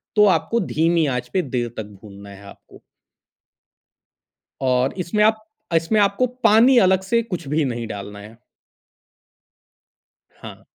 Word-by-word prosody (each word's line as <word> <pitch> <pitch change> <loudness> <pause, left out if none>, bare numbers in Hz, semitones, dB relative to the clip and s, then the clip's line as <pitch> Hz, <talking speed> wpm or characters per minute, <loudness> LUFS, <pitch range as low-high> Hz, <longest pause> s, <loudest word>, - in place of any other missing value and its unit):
तो 210 - +5
आपको 235 - -3
धीमी 165 +1 +1
आँच 125 0 -4
पे 185 - +1
देर 125 -6 -3
तक 110 - -3 0.2
भूनना 100 -1 -13
है 100 0 -13
आपको। - - -16 1.8
और 130 0 +1
इसमें 185 +4 0
आप 220 0 +2 0.3
अ, - - 0
इसमें 165 +7 +1
आपको 200 +5 +1 0.2
पानी 230 +4 +5
अलग 190 -2 +4
से 230 +4 +1
कुछ 180 -9 -6
भी 150 +3 0
नहीं 120 -2 -4
डालना 100 0 -8
है। 110 +3 -13 2.0
हाँ। - - -13
160 Hz, 140 wpm, -21 LUFS, -, 2.0 s, तो